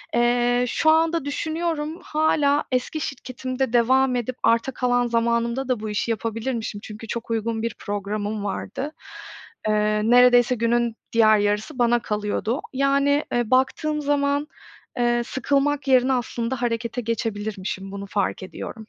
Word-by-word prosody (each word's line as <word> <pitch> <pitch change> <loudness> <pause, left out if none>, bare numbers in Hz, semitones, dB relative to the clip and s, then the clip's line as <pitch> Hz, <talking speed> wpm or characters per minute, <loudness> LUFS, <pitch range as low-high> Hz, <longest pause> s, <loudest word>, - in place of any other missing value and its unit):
Eee, 245 +1 +2
şu 315 - +2
anda 325 -1 +2
düşünüyorum, 315 +1 -2
hâlâ 300 -2 +2
eski 255 +5 -1
şirketimde 255 -1 -4
devam 255 +2 +3
edip, 245 +1 -2
arta 230 +3 +3
kalan 245 -1 +1
zamanımda 235 +2 0
da, 255 -3 0
bu 215 0 -5
işi 210 +2 -1
yapabilirmişim, 225 -1 -3
çünkü 220 +1 -9
çok 235 +1 -5
uygun 225 0 -1
bir 230 -1 -3
programım 205 +1 -3
vardı. 265 +8 -4 0.8
Iıı, 210 +1 +1
neredeyse, 245 0 +6
günün 235 0 +1 0.2
diğer 215 -2 +5
yarısı 210 +7 -1
bana 240 0 +3
kalıyordu. 210 +4 -2
Yani, 280 +2 +2
ııı, 240 -1 0
baktığım 300 +4 +1
zaman, 285 0 +1 0.5
ııı, 240 0 +2
sıkılmak 280 +3 0
yerine, 260 0 +4
aslında 245 0 -2
harekete 235 0 -2
geçebilirmişim, 205 -4 -3
bunu 200 0 -6
fark 195 -1 -1
ediyorum. 185 - -7
240 Hz, 135 wpm, -23 LUFS, 220-270 Hz, 0.8 s, neredeyse